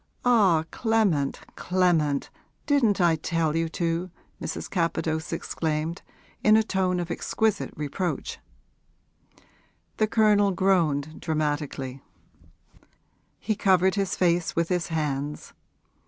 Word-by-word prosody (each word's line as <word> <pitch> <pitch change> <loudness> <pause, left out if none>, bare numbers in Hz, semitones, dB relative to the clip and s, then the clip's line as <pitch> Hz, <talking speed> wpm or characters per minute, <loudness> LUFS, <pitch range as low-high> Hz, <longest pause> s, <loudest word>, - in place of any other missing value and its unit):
'Ah, 200 -10 +4
Clement, 210 - +1
Clement, 170 -6 +1 0.3
didn't 245 -9 +2
I 170 -2 +4
tell 160 0 -1
you 165 0 0
to?' 170 +2 -2 0.3
Mrs. - - -4
Capadose 165 -3 -1
exclaimed 160 +2 -2 0.4
in 215 0 +6
a 220 - +3
tone 185 -3 0
of 175 -1 -4
exquisite 220 +4 -1
reproach. 150 +5 -3 1.6
The 215 - +2
Colonel 210 -2 +4
groaned, 160 -6 +1
dramatically; 145 -4 -2 1.4
he 215 - -2
covered 190 -1 +3
his 195 -1 -1
face 175 -1 +1
with 170 0 0
his 180 -2 0
hands. 150 -2 -3
170 Hz, 105 wpm, -26 LUFS, 155-195 Hz, 1.6 s, in